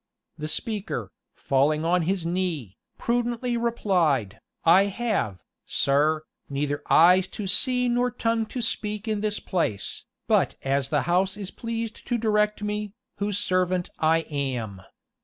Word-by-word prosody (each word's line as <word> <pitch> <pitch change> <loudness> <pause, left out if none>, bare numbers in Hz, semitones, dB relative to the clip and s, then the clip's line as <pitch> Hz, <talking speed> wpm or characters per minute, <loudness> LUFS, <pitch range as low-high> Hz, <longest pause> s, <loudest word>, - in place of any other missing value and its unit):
The 155 - -5
speaker, 195 - -3 0.2
falling 150 +4 +1
on 180 +1 +3
his 180 +1 -1
knee, 170 - -2 0.2
prudently 240 +1 0
replied, 180 - +1 0.3
"I 180 +4 +7
have, 200 - -2 0.2
sir, 150 +3 +2 0.3
neither 145 +1 -1
eyes 180 +3 +6
to 210 - -6
see 250 +6 +2
nor 245 +1 +2
tongue 230 -1 0
to 245 +1 -3
speak 210 -1 -2
in 215 -2 0
this 210 -1 -1
place, 135 - -2 0.2
but - - +3
as 135 0 0
the 145 - +1
house 185 +3 +1
is 200 -2 -6
pleased 230 -1 -5
to 240 - +1
direct 210 -2 +1
me, 210 -1 -3 0.2
whose 205 0 -1
servant 185 -2 0
I 160 +1 +3
am. 130 -10 -3
185 Hz, 140 wpm, -26 LUFS, 150-215 Hz, 0.3 s, I